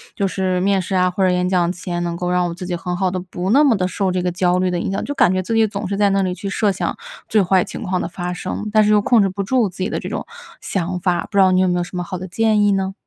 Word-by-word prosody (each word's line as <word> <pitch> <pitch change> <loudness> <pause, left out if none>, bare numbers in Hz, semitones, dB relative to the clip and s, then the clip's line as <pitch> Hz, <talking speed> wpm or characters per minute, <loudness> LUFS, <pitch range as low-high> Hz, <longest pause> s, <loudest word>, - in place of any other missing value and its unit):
就 200 - 0
是 185 -1 -1
面 195 +1 +2
试 185 - -5
啊， 180 0 +3
或 185 +2 -1
者 185 - +4
演 180 0 +1
讲 180 -2 +1
前， 175 -1 -4
能 170 -1 -3
够 180 0 -2
让 180 0 +1
我 - - -5
自 180 +2 -7
己 180 0 -2
很 175 +1 -4
好 190 0 +1
地、 185 0 -3
不 180 +1 -4
那 280 +5 +5
么 255 -7 +4
地 185 -1 0
受 190 0 -1
这 180 - -1
个 180 0 -1
焦 180 0 +1
虑 185 0 +1
的 180 -1 -1
影 180 - -2
响。 195 - -1
就 285 - -3
感 275 - +3
觉 185 0 0
自 205 +5 -3
己 225 0 +4
总 205 -2 -4
是 200 - -2
在 205 0 +3
那 195 0 +2
里 185 -1 -1
去 195 +2 -5
设 205 0 +1
想 - - -3 0.3
最 215 - +4
坏 190 -1 +3
情 - - -7
况 185 0 -1
的 - - -3
发 180 0 -4
生， 210 +4 -5
但 215 - +5
是 210 - +2
又 210 -1 +5
控 230 +1 +4
制 195 - +2
不 195 +2 -4
住 235 0 +1
自 180 - -15
己 185 +3 -2
的 - - -2
这 - - -6
种 - - -4 0.3
想 180 -1 -3
法， 175 -1 0
不 200 - -2
知 - - +7
道 190 -1 +5
你 185 - +3
有 185 - +3
没 180 - +1
有 175 - 0
什 180 - -9
么 180 - -2
好 185 +1 -5
的 185 +1 -7
建 215 +3 +2
议 205 -1 +3
呢？ 195 0 -1
185 Hz, 365 characters per minute, -19 LUFS, 180-200 Hz, 0.3 s, 知